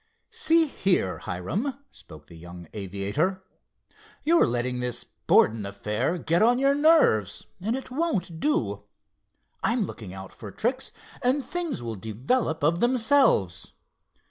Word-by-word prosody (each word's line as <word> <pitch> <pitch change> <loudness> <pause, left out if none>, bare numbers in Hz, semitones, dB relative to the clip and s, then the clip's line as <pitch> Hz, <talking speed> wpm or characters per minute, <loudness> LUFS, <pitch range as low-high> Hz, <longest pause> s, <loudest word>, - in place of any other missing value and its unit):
"See 325 +1 +3
here, 185 - 0
Hiram," 190 - -3
spoke 75 -1 -14
the 85 - -14
young 85 +1 -11
aviator, 105 - -2 0.8
"you're 335 +2 +4
letting 125 +1 -1
this 125 0 -2
Borden 110 -2 +2
affair 105 - -2
get 170 0 +1
on 240 +3 +5
your 275 +1 +3
nerves, 290 - +3
and 220 +6 -1
it 265 -1 -7
won't 250 - -2
do. 305 - -1 0.8
I'm 230 -2 +1
looking 105 - -8
out 95 0 -9
for 105 - -9
tricks, 255 - -2 0.3
and 260 +1 +1
things 340 - -3
will 115 -1 -4
develop 135 - -1
of 165 +3 +2
themselves. 240 - +2
165 Hz, 130 wpm, -26 LUFS, -, 0.8 s, on